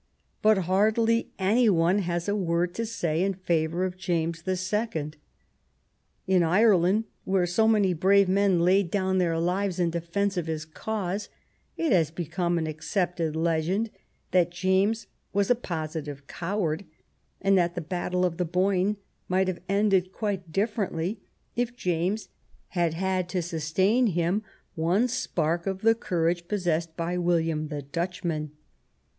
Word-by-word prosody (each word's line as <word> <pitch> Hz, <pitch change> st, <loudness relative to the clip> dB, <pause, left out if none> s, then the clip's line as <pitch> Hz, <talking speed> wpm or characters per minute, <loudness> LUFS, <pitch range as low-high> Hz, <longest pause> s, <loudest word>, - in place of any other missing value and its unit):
But 215 Hz, -1 st, +5 dB
hardly 220 Hz, +5 st, +2 dB
any 215 Hz, +5 st, +3 dB
one 175 Hz, +1 st, +3 dB
has 175 Hz, -2 st, -2 dB
a 205 Hz, -, +1 dB
word 175 Hz, -2 st, 0 dB
to 230 Hz, +3 st, -3 dB
say 170 Hz, -7 st, -1 dB
in 195 Hz, 0 st, +1 dB
favor 170 Hz, -1 st, 0 dB
of 185 Hz, 0 st, -4 dB
James 170 Hz, -2 st, -1 dB
the 185 Hz, +1 st, -1 dB
Second. 185 Hz, -6 st, -2 dB, 1.1 s
In 185 Hz, -1 st, +3 dB
Ireland, 190 Hz, +3 st, +4 dB, 0.2 s
where 190 Hz, -1 st, +1 dB
so 185 Hz, +6 st, +2 dB
many 205 Hz, -4 st, +3 dB
brave 195 Hz, +4 st, +4 dB
men 190 Hz, -2 st, +3 dB
laid 185 Hz, +1 st, +3 dB
down 190 Hz, 0 st, +1 dB
their 170 Hz, -2 st, +1 dB
lives 180 Hz, +2 st, 0 dB
in 170 Hz, -2 st, +2 dB
de 170 Hz, 0 st, -2 dB
fence 195 Hz, +3 st, -1 dB
of 170 Hz, -2 st, -1 dB
his 155 Hz, -1 st, -3 dB
cause, 200 Hz, +3 st, -4 dB, 0.5 s
it 330 Hz, -4 st, 0 dB
has 170 Hz, -6 st, +4 dB
become 175 Hz, +1 st, -2 dB
an 160 Hz, -, 0 dB
accepted 160 Hz, +1 st, -2 dB
legend 170 Hz, +7 st, 0 dB, 0.4 s
that 180 Hz, -2 st, +3 dB
James 190 Hz, +5 st, +1 dB, 0.3 s
was 200 Hz, +3 st, +2 dB
a -, -, +8 dB
positive 155 Hz, -, -5 dB
coward, 175 Hz, 0 st, -2 dB, 0.6 s
and 195 Hz, 0 st, +3 dB
that 175 Hz, -1 st, +2 dB
the -, -, -2 dB
battle 180 Hz, +2 st, -1 dB
of 170 Hz, -2 st, -2 dB
the 180 Hz, -, +1 dB
Boyne 185 Hz, +3 st, +1 dB, 0.3 s
might 185 Hz, +1 st, +2 dB
have 185 Hz, -2 st, -3 dB
ended 195 Hz, -2 st, +2 dB
quite 195 Hz, -5 st, -3 dB
differently 200 Hz, -1 st, -1 dB, 0.4 s
if 245 Hz, 0 st, -1 dB
James 180 Hz, +2 st, -1 dB, 0.4 s
had 170 Hz, -3 st, 0 dB
had 185 Hz, 0 st, -1 dB
to 180 Hz, -2 st, -1 dB
sustain 185 Hz, +9 st, +1 dB
him 175 Hz, +2 st, +1 dB, 0.3 s
one 175 Hz, +9 st, +2 dB
spark 170 Hz, -7 st, -1 dB
of 190 Hz, 0 st, -2 dB
the 225 Hz, 0 st, +6 dB
courage 170 Hz, -5 st, -1 dB
possessed 170 Hz, -5 st, -1 dB
by 175 Hz, +1 st, -1 dB
William 165 Hz, -3 st, +1 dB
the 145 Hz, -2 st, -5 dB
Dutchman. 165 Hz, 0 st, -3 dB
180 Hz, 150 wpm, -27 LUFS, 170-200 Hz, 1.1 s, a